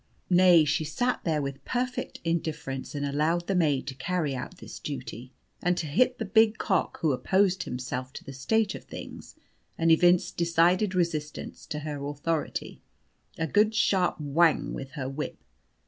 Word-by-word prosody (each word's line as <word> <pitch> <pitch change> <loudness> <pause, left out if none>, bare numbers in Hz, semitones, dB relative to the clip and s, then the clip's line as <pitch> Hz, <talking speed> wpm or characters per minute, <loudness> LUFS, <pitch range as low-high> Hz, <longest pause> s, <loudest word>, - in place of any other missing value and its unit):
Nay, 175 -3 +7
she 150 +2 +1
sat 245 +11 -1
there 155 -4 +1
with 140 0 -5
perfect 250 +1 -3
indifference 155 -5 -3
and 145 0 -2
allowed 155 +5 0
the 195 - -1
maid 150 -7 +2
to 140 - -5
carry 155 +2 -1
out 130 +8 -6
this - - -10
duty, 130 -3 -6 0.3
and 180 0 +1
to 165 - -2
hit 250 - +2
the 225 - -3
big 220 +1 +4
cock 190 -3 0
(who 160 -3 +3
opposed 185 +8 +2
himself 125 +1 -4
to - - -8
the 135 - -9
state 220 +12 +1
of - - -9
things - - -9 0.4
and 165 0 +3
evinced 175 +2 +4
decided 175 +4 +3
resistance 155 -4 -2
to 150 - -4
her 145 -2 -5
authority) 145 +2 -3 0.6
a 165 - 0
good 210 +7 +3
sharp 185 -5 +2
whang 155 +2 +2
with 135 -1 -7
her 135 -5 -4
whip. 135 +3 -4
165 Hz, 165 wpm, -27 LUFS, 145-185 Hz, 0.6 s, Nay